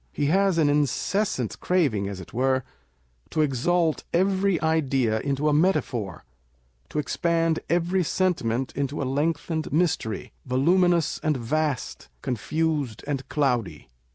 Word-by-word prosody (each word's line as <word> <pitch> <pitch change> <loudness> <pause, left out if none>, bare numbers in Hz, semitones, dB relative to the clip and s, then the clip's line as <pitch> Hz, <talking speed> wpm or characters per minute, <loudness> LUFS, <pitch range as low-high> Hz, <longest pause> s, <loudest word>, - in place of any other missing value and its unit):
He 145 - -1
has 195 -2 +3
an 155 -3 +4
incessant 145 - 0
craving, 140 - +1
as 100 -2 -6
it 95 - -11
were, 130 +1 +1 0.7
to 155 - 0
exalt 155 +4 +1
every 190 0 +2
idea 135 -8 +1
into 140 +4 -1
a 150 - +3
metaphor, 125 - 0 0.6
to - - -6
expand 165 +2 +1
every 175 +2 +1
sentiment 135 -9 0
into 140 +1 -2
a - - -2
lengthened 155 +3 -1
mystery, 150 - -1
voluminous 170 +5 +2
and 155 -3 +1
vast, 140 - -2
confused 145 -1 -1
and 140 -2 -3
cloudy. 120 - -1
150 Hz, 125 wpm, -25 LUFS, 130-170 Hz, 0.7 s, an